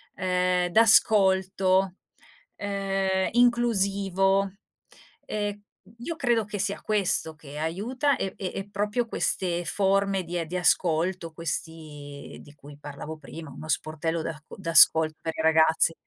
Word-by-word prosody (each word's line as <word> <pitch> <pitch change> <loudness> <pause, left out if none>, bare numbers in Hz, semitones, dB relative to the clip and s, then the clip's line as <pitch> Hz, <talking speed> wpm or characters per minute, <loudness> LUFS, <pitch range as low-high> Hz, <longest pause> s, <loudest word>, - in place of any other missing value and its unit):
ehm, 180 -1 0
d'ascolto, 190 -3 +3 0.6
ehm, 195 -1 -2
inclusivo, 200 -5 +1 0.7
ehm, 205 -1 -4 0.4
io 330 +8 -5
credo 240 -7 +1
che 205 0 -6
sia 200 +1 -1
questo 195 -6 +1
che 145 -1 -12
aiuta 235 - -2
e 190 - -4
e 185 -2 -5
e 195 +1 -6
proprio 210 +4 -2
queste 175 -5 0
forme 195 +1 0
di 175 +1 -5
ehm, 170 - -3
di 180 +3 -4
ascolto, 175 0 0
questi 155 -3 -6
di 145 - -16
cui 145 0 -14
parlavo 145 +2 -9
prima 155 +1 -11
uno 155 +4 -11
sportello 160 +1 -2
d'ac 160 -1 -7
d'ascolto 160 -3 +5
per 160 -1 -4
i - - -2
ragazzi. 160 +1 +3
185 Hz, 125 wpm, -25 LUFS, 160-200 Hz, 0.7 s, d'ascolto